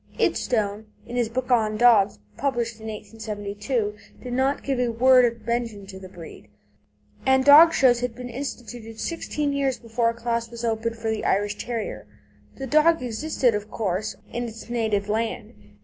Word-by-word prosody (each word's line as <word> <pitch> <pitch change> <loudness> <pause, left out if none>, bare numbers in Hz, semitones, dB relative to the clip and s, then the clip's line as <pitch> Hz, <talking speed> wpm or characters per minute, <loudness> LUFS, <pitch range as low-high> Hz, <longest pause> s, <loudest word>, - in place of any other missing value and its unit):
Idstone, 215 -2 0 0.2
in 240 - -7
his 240 -2 +1
book 255 +2 -3
on 215 -3 +2
dogs, 220 - +5 0.2
published 240 -5 -2
in 220 - -7
1872 210 +1 -4 0.3
did 250 -1 -5
not 265 +3 0
give 270 -2 -1
a 245 -1 +1
word 250 +2 +5
of 230 -2 -3
mention 230 -4 -2
to 190 -1 -10
the 190 -1 -11
breed, 165 - -12 0.8
and 265 0 +3
dog 305 +4 +9
shows 250 -5 +4
had 245 -1 -3
been 250 0 -7
instituted 240 -3 -7
sixteen 300 -3 -2
years 275 -2 0
before 230 0 0
a 230 - -4
class 235 0 -2
was 235 0 -6
opened 230 0 -1
for 225 0 -2
the 220 - -3
Irish 205 +1 +1
Terrier. 225 - -5 0.5
The 270 - -6
dog 305 +2 +3
existed, 250 +1 0
of 210 0 -4
course, 195 -2 -2 0.2
in 240 +1 -2
its 230 +1 -10
native 220 -4 0
land. 220 0 -2
230 Hz, 170 wpm, -24 LUFS, 215-250 Hz, 0.8 s, dog